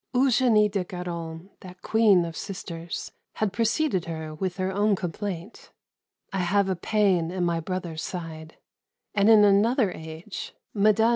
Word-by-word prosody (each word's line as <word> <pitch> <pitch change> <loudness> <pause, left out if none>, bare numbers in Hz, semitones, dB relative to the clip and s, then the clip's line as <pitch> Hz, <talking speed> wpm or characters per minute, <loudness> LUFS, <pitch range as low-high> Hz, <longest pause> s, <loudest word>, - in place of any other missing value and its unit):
Eugenie 245 -4 +4
de 200 -2 -1
Guerin, 175 -1 -6
that 180 -1 -13
queen 210 -6 +4
of 165 -1 -6
sisters, 170 -3 -6 0.2
had 215 -3 -1
preceded 230 - +1
her 160 -2 -5
with 180 +4 -3
her 185 0 -1
own 205 +1 +2
complaint, 185 +2 -5 0.6
"I 195 - -1
have 195 +2 +2
a 190 - +1
pain 185 -3 +1
in 180 0 -1
my 170 -1 0
brother's 170 -2 -4
side"; 160 -2 -7 0.6
and 205 +1 +4
in 215 -2 +8
another 205 +2 +4
age 160 +4 -8 0.2
Mme. 215 +1 +4
185 Hz, 145 wpm, -26 LUFS, 170-210 Hz, 0.6 s, in